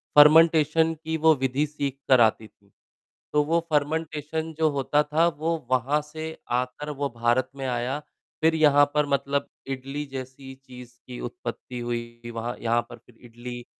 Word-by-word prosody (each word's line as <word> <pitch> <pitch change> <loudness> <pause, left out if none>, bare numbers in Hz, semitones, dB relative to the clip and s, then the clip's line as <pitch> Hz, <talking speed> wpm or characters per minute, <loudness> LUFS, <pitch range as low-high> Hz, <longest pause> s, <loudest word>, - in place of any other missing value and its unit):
Fermentation 160 +1 +6
की 160 0 -2
वो 160 - +8
विधि 130 +2 0
सीख 140 -2 -4
कर 130 -3 +6
आती 110 0 +2
थीं। 100 -1 -31 0.6
तो 150 0 +4
वो 165 +3 +2
फर्मेन्टेशन 155 +1 -1
जो 160 -1 +4
होता 145 +1 +1
था, 155 +3 +2
वो 165 +1 -1
वहाँ 135 +4 +2
से 160 +1 -6 0.2
आकर 130 +4 -7
वो 145 -1 -2
भारत 120 +2 +1
में 135 -1 -5
आया। 125 +3 -2 0.4
फिर 160 0 +3
यहाँ 145 -2 +5
पर 150 0 +3
मतलब 140 +1 0 0.2
इडली 135 +2 -4
जैसी 130 +1 -9
चीज़ 125 -1 -13
की 125 -1 -8
उत्पत्ति 130 - -7
हुई। 120 0 -5
वहाँ 115 +1 -4
यहाँ 120 0 +2
पर 120 - -10
फिर 125 - -21
इडली 120 +1 -8
140 Hz, 160 wpm, -25 LUFS, 125-155 Hz, 0.6 s, वो